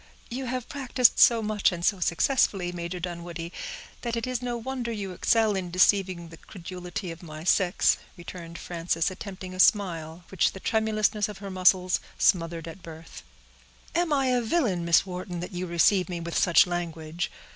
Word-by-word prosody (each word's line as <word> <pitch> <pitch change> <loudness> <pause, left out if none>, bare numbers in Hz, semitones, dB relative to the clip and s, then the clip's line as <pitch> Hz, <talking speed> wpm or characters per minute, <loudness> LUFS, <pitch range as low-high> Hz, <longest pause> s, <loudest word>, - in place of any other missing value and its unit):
"You 260 +2 -4
have 250 -1 -3
practiced 255 -3 +2
so 230 -2 +6
much, 210 -1 +2
and 175 -1 -4
so 200 - +2
successfully, 180 0 +1
Major 175 +1 -5
Dunwoodie, 170 -1 -6 0.5
that 235 -1 -2
it 230 - -2
is 255 -1 -2
no 245 -1 -2
wonder 245 0 -4
you 200 -4 -4
excel 215 +3 +2
in 185 -2 -3
deceiving 185 -1 +2
the 165 - -12
credulity 180 0 -7
of 165 - -10
my 155 -2 -9
sex," 180 0 +3 0.2
returned 170 -1 -9
Frances, 165 0 -1
attempting 185 -1 -8
a 185 - -9
smile, 175 -5 +2
which 190 - +1
the 190 - -8
tremulousness 215 -1 +1
of 210 - -8
her 195 -1 -7
muscles 185 0 +3 0.2
smothered 165 -2 +1
at 165 +3 -9
birth. 165 0 -11 0.7
"Am 345 -2 +1
I 270 -3 +2
a 250 -1 +2
villain, 225 - 0
Miss 170 +2 +4
Wharton, 180 -1 -5
that 180 - -6
you 180 +1 -3
receive 180 +3 +3
me 175 -1 -3
with 170 0 -5
such 175 +2 +5
language? 170 -1 -4
185 Hz, 175 wpm, -27 LUFS, 170-215 Hz, 0.7 s, so